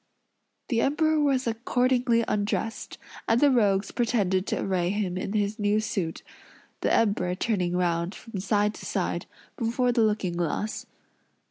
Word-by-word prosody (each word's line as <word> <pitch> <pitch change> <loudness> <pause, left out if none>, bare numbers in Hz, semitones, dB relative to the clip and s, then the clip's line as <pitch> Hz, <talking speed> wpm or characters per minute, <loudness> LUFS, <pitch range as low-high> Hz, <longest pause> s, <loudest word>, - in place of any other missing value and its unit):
The 230 -4 +2
Emperor 310 +3 +2
was 275 -3 +2
accordingly 240 +1 +1
undressed, 210 +2 -2 0.3
and 225 +1 +3
the 285 +1 +5
rogues 205 -5 +2
pretended 200 -6 +1
to - - -1
array 180 -2 0
him 195 -2 -1
in 190 +2 -3
his 210 +1 -1
new 205 +1 +2
suit; 190 -6 -3 0.6
the - - 0
Emperor 200 -5 +2
turning 180 -4 0
round, 170 0 0
from 225 -4 -7
side 205 +2 +1
to - - -10
side, - - -2 0.3
before 245 +1 +1
the 235 -1 +2
looking 210 -5 +1
glass. 175 +5 -2
210 Hz, 145 wpm, -26 LUFS, 190-235 Hz, 0.6 s, the